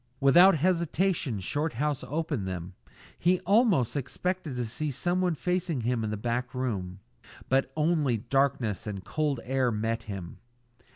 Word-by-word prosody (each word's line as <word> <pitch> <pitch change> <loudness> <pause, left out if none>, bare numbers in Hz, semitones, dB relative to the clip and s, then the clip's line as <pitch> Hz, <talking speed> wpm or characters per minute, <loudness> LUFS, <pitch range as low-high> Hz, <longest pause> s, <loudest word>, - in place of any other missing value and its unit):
Without 175 +8 +7
hesitation 170 - 0
Shorthouse 145 - -2
opened 150 - -2
them. 90 0 -5 0.5
He 180 +1 +3
almost 195 - +3
expected 160 +2 -3
to 125 -1 -2
see 145 +7 -3
someone 175 +5 0
facing 180 -4 -1
him 120 0 0
in 110 - -2
the 105 - -3
back 120 +3 -2
room; 100 -7 -3 0.5
but 135 0 +2
only 150 -6 +2
darkness 120 -3 0
and 100 -3 -5
cold 150 -5 -1
air 130 -1 +1
met 110 +1 -1
him. 95 -4 -6
135 Hz, 135 wpm, -28 LUFS, 115-165 Hz, 0.5 s, Without